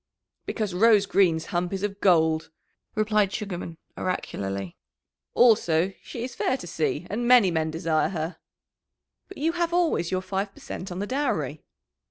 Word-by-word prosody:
"Because 210 -5 -2
Rose 210 +1 +5
Green's 170 -5 +2
hump 175 0 0
is 195 0 -3
of 205 -1 -3
gold," 160 -4 +3 0.5
replied 215 -2 +2
Sugarman 180 -6 -5 0.2
oracularly. 95 - -3 0.6
"Also, 195 -7 +4
she 235 - -7
is 250 0 -5
fair 260 - 0
to 255 - -9
see, 160 0 -2
and 240 +4 -2
many 240 -7 +6
men 160 -1 0
desire 160 -1 0
her." 165 -1 -4 0.9
"But 390 - -12
you 320 +3 +1
have 340 0 -1
always 325 - +1
your 185 0 -1
five 195 +1 -3
per - - -14
cent 185 - -7
on 175 - -5
the 200 - -2
dowry." 190 - -1
190 Hz, 160 wpm, -26 LUFS, 165-220 Hz, 0.9 s, many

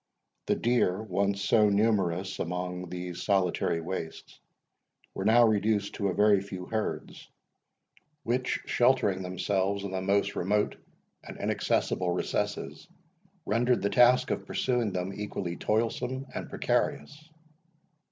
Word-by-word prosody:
The - - +2
deer, 115 -6 +1
once 100 -1 -1
so 105 +1 +4
numerous 100 -3 +1
among 90 +1 -4
these 90 0 -6
solitary 95 -4 +1
wastes, 80 -1 -6 0.7
were - - -4
now 120 +2 +6
reduced 105 -1 +1
to 100 - -1
a 95 - 0
very 105 -2 +4
few 95 -2 -7
herds, 110 +1 -4 0.9
which, 125 +2 -1
sheltering 120 -7 +2
themselves 95 +2 -1
in 100 - -4
the 95 0 -2
most 100 +1 +1
remote 105 +3 0 0.5
and - - -9
inaccessible 90 -1 0
recesses, 90 - -3 0.6
rendered 120 +2 +1
the 100 - +1
task 125 +1 +5
of - - -3
pursuing 125 -5 0
them 90 +1 -3
equally 95 -4 -4
toilsome 120 +6 -1
and - - -5
precarious. 155 +2 -2
100 Hz, 125 wpm, -28 LUFS, 90-110 Hz, 0.9 s, now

